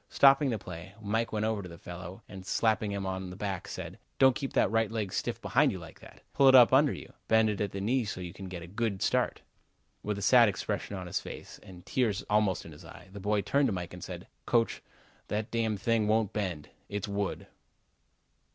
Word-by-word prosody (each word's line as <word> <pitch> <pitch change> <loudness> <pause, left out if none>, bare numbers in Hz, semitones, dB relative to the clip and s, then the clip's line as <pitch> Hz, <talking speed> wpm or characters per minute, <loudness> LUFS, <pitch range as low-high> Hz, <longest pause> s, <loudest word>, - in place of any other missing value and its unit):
Stopping 135 0 +5
the 115 - 0
play, 90 0 -9
Mike 110 +2 -1
went 110 0 0
over 110 -2 0
to 90 - -8
the 85 - -10
fellow 90 +1 -9
and 95 -2 -9
slapping 110 +1 +1
him 100 -1 -3
on 95 -1 -3
the 90 - -8
back 95 -1 -4
said: - - -7 0.2
"Don't 130 -2 +6
keep 135 - -4
that - - +3
right 115 -1 +2
leg 105 -4 -3
stiff - - -2
behind - - +3
you - - -5
like - - -11
that. - - -15
Pull 135 - +5
it 130 - +8
up 125 -1 +8
under 140 +1 +6
you. - - -8
Bend 110 -1 +4
it 105 - -4
at 100 -2 -1
the 100 - -5
knee 120 +5 +1
so 100 -3 -5
you 90 -1 -6
can 95 0 -8
get 90 -2 -7
a - - -9
good 105 +1 -2
start." - - +1 0.6
With 105 -1 -2
a - - -5
sad 120 +1 +7
expression 100 +2 -3
on 90 - -6
his 90 - -1
face, - - -9
and 90 -2 -13
tears 110 -6 0
almost 105 -3 +2
in 80 - -10
his 75 - -13
eyes, - - -13
the 100 - -7
boy 105 +1 +1
turned 140 +6 +2
to 110 - 0
Mike 90 -2 -5
and 90 - -9
said: - - -7 0.2
"Coach, 115 -1 +2 0.5
that 105 +2 -3
damn 115 -2 0
thing 110 +2 +1
won't 110 -1 +2
bend. 90 -8 -3 0.2
It's 105 -1 -3
wood." 100 0 -2
105 Hz, 230 wpm, -30 LUFS, 95-115 Hz, 0.6 s, it